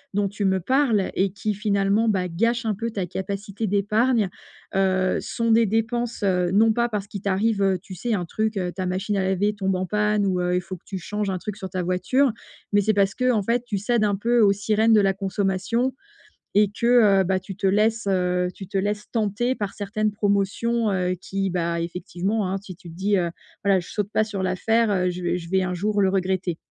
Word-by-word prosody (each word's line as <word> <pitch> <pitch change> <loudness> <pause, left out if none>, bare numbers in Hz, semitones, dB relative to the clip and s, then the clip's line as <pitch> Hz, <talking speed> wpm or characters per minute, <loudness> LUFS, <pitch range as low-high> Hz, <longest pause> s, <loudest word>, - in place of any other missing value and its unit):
dont 205 -1 +2
tu 205 +1 -5
me 190 -1 +2
parles 240 - +1
et 190 0 +1
qui 210 +1 -2
finalement, 205 +1 +1
bah, 185 -3 0
gâchent 230 +7 0
un 220 - +1
peu 230 +4 -3
ta 200 -5 -3
capacité 200 +4 -4
d'épargne, 210 +2 +2 0.5
heu, 185 -1 +2
sont 230 -1 -1
des 225 0 +5
dépenses, 230 +2 -1
heu, 180 -2 +2
non 220 +3 +4
pas 235 +1 +1
parce 210 -3 -3
qu'il 200 -2 -7
t'arrive, 200 +2 +1
heu, 195 -1 +3
tu 190 +1 -11
sais? 235 +6 -2
Un 180 - -2
truc 220 +4 -2
heu, 180 -2 -1
ta 185 -1 -4
machine 195 +3 -1
à 190 - +1
laver 190 +2 +1
tombe 195 -2 -1
en 185 0 -1
panne, 210 +1 +1
heu, - - +2
ou 180 -1 0
il 180 - +1
faut 180 +1 -7
que - - -29
tu 195 - -5
changes 205 +3 -3
un 185 - -1
truc 210 +2 -6
sur 190 - -6
ta 185 0 -3
voiture, 185 +10 +2 0.4
mais 205 - +5
c'est 215 +2 +2
parce 195 -1 +2
qu'en 250 -5 +1
fait 235 +3 0
tu 215 -4 -2
cèdes 215 +3 +1
un 205 -1 +2
peu 235 +4 +1
aux 205 -2 +6
sirènes 215 +2 +2
de 210 - +6
la 195 -1 +2
consommation 195 +5 -1 0.6
et 205 -1 +4
que, 235 +3 -1 0.3
heu, - - +2
bah, 190 +1 0
tu 190 +1 -9
te 195 0 0
laisses, 215 +3 +2
heu, 180 -1 +1
tu 195 - -9
te 195 - -3
laisses 205 +2 -2
tenter 225 +2 0
par 205 -4 -4
certaines 215 +1 -1
promotions, 205 +2 0
heu, 180 -1 0
qui, 195 -1 -2
bah, 170 -1 -1
effectivement, 180 +4 -2
hein, 195 - -1
si 190 -2 -10
tu 175 -1 -13
te 165 - -10
dis: 200 +3 +1
«Heu, 175 -2 0 0.3
voilà 195 -2 +4
je 175 - -9
saute 205 -1 -3
pas 215 - +2
sur 210 -3 -4
l'affaire, 220 +5 +1
heu, 180 -2 +1
je 180 0 -6
vais 175 0 0
je 170 - -8
vais 190 +1 +2
un 180 0 -2
jour 205 +3 0
le 190 - +3
regretter». 185 -2 -1
200 Hz, 230 wpm, -24 LUFS, 185-215 Hz, 0.6 s, aux